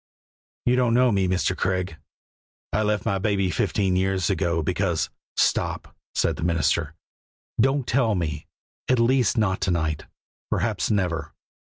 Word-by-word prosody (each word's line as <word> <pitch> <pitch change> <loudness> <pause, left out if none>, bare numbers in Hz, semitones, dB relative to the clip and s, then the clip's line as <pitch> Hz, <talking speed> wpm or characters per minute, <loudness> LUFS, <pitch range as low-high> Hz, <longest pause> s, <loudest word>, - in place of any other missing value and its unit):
"You 125 - +4
don't 120 -2 +2
know 125 0 +4
me, 95 -2 +2
Mr. 95 0 +1
Craig. 90 -3 -1 0.8
I 110 - +2
left 105 -1 0
my 100 - +1
baby 95 -2 +1
fifteen 95 +4 +1
years 95 0 +1
ago 85 -3 0
because 85 -2 0
" - - -75
"Stop!" - - 0 0.2
said - - +1
the - - -4
minister. 80 -2 +1 0.6
"Don't 135 +2 +2
tell 115 -3 +2
me, 80 -2 -3 0.4
at 130 - +4
least 125 0 +3
not 100 -4 +1
to - - +1
night; 80 -3 -1 0.4
perhaps 105 -9 0
never. 85 -7 -1
95 Hz, 150 wpm, -24 LUFS, 85-110 Hz, 0.8 s, You